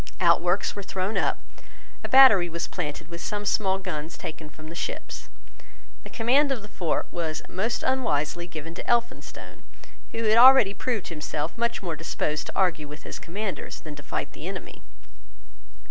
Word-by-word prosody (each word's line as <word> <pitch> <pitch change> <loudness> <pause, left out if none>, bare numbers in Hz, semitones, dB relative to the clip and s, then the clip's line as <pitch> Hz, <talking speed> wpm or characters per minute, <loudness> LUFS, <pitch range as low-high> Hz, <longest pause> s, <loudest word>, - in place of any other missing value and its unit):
Outworks 175 +2 +3
were 200 - -4
thrown 190 +2 -3
up. - - +1 0.7
A - - -4
battery 235 -10 +8
was 170 0 -3
planted 155 -3 -5
with 170 0 -7
some 205 -1 -3
small 195 -2 +2
guns 170 -4 -5
taken 160 -3 -7
from 155 +1 -12
the - - -7
ships. 170 - -5 0.7
The - - -10
command 270 +5 +3
of 240 -6 -2
the - - -9
fort 175 -5 -1
was 160 -2 -3
most 225 +6 -2
unwisely 175 - 0
given 165 -1 -7
to - - -8
Elphinstone, 235 +1 -2 0.5
who 230 - -3
had 220 +1 +5
already 255 -5 +8
proved 230 -3 -2
himself 150 0 -4
much 235 -3 -1
more 170 -3 -2
disposed 155 -1 -2
to - - -8
argue 165 -5 +1
with 150 +1 -10
his - - -7
commanders 195 +3 -5
than 155 -2 -8
to 145 - -10
fight - - -4
the - - -8
enemy. - - -7
180 Hz, 170 wpm, -26 LUFS, 160-220 Hz, 0.7 s, battery